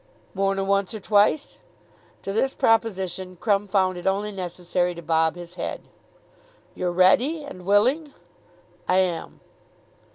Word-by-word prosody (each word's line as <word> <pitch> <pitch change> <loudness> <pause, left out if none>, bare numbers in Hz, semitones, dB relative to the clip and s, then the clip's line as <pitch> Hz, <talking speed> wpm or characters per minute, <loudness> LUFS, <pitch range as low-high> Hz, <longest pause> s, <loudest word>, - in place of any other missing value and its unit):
"More 195 0 0
nor 195 0 -1
once 200 +1 0
or - - -5
twice?" 210 +8 +2 0.6
To 195 - -4
this 265 +5 0
proposition 190 -5 0
Crumb 205 -2 +1
found 185 -2 +1
it 175 - -5
only 200 +2 0
necessary 180 -1 -2
to 170 - -8
bob 160 0 +1
his 175 0 -9
head. - - -4 0.9
"You're 180 -1 -2
ready, 240 - +3
and 185 -10 -10
willing?" 255 +10 +2 0.8
"I 185 +1 +4
om." 165 -2 -8
195 Hz, 135 wpm, -24 LUFS, 180-210 Hz, 0.9 s, I